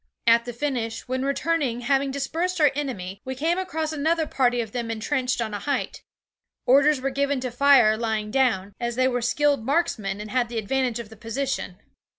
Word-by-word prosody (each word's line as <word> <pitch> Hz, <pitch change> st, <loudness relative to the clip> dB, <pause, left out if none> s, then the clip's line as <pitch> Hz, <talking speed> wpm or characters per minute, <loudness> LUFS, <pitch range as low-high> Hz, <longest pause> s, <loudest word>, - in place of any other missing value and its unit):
At 230 Hz, 0 st, +5 dB
the 245 Hz, -, -4 dB
finish, 235 Hz, -3 st, -3 dB
when 260 Hz, +1 st, -2 dB
returning, 280 Hz, -3 st, 0 dB
having 275 Hz, +2 st, +1 dB
dispersed 330 Hz, +7 st, -2 dB
our 300 Hz, -2 st, +5 dB
enemy, 200 Hz, -10 st, -4 dB
we 260 Hz, 0 st, -5 dB
came 330 Hz, +7 st, 0 dB
across 320 Hz, -4 st, -3 dB
another 320 Hz, +2 st, +1 dB
party 245 Hz, -4 st, +1 dB
of 225 Hz, -3 st, -3 dB
them 235 Hz, -1 st, -3 dB
entrenched 250 Hz, +3 st, -1 dB
on 220 Hz, -2 st, -2 dB
a 205 Hz, -, -3 dB
height. 285 Hz, +6 st, -2 dB, 0.6 s
Orders 280 Hz, +2 st, +5 dB
were 270 Hz, +1 st, -2 dB
given 280 Hz, 0 st, 0 dB
to 255 Hz, -1 st, -3 dB
fire 250 Hz, -4 st, +5 dB
lying 220 Hz, -2 st, -2 dB
down, 210 Hz, -7 st, +1 dB
as 240 Hz, -1 st, -2 dB
they 255 Hz, +1 st, +3 dB
were 245 Hz, -1 st, 0 dB
skilled 285 Hz, +1 st, +1 dB
marksmen 230 Hz, -, 0 dB
and 210 Hz, 0 st, -7 dB
had 250 Hz, -2 st, +1 dB
the 235 Hz, -, -5 dB
advantage 245 Hz, +2 st, 0 dB
of 235 Hz, -3 st, -7 dB
the 220 Hz, -, -13 dB
position. 235 Hz, -4 st, -3 dB
255 Hz, 190 wpm, -24 LUFS, 230-280 Hz, 0.6 s, At